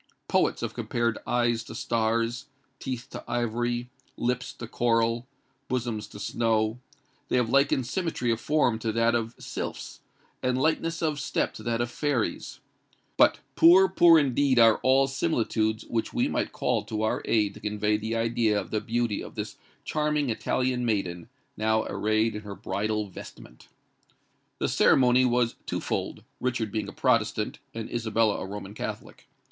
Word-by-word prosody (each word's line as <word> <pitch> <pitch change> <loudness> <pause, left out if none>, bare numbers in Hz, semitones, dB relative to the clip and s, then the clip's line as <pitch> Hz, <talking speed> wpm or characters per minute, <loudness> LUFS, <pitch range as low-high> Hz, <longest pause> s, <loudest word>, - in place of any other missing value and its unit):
Poets - - +1
have - - -3
compared 115 -1 -1
eyes 120 -1 +1
to 115 - -9
stars—teeth 120 +3 -3
to - - -7
ivory—lips 120 +1 -2
to 120 - -8
coral—bosoms 115 -1 -2
to 105 - -11
snow;—they 110 +3 -2
have 120 -2 +1
likened 140 -1 +3
symmetry 160 -6 -1
of 115 - -1
form 145 -7 +2
to 110 -1 -1
that 115 +1 +2
of 115 0 -1
sylphs, - - -6 0.4
and 130 0 0
lightness 165 +3 0
of 155 -2 0
step - - -1
to - - -10
that 115 -1 -1
of 120 0 -2
fairies;—but 140 -4 -1 0.2
poor, 185 +3 +7
poor 170 -2 +6
indeed 140 -2 +2
are 115 -2 +7
all 135 +1 +4
similitudes 115 -6 0
which 115 -1 -2
we - - +2
might - - -1
call - - 0
to 110 0 -3
our 110 - 0
aid 105 -3 +2
to - - -12
convey 105 0 -1
an 110 +2 -1
idea 115 -2 +1
of - - -7
the 110 - 0
beauty 115 -2 -1
of - - -10
this - - -5 0.3
charming 150 -3 0
Italian 125 +2 0
maiden, 95 -7 -2 0.3
now 110 0 +1
arrayed 110 +3 0
in 105 - -5
her 105 -1 -8
bridal 105 +3 -2
vestment! 75 -9 -12 0.9
The - - 0
ceremony 125 -1 +4
was 120 -1 +1
twofold, - - -3 0.2
Richard 120 -4 -1
being 110 -1 -2
a - - -6
Protestant 110 -4 0 0.2
and 115 -1 -4
Isabella 115 -2 +1
a - - -5
Roman 100 0 -7
Catholic. - - -7
115 Hz, 150 wpm, -27 LUFS, 110-125 Hz, 0.9 s, poor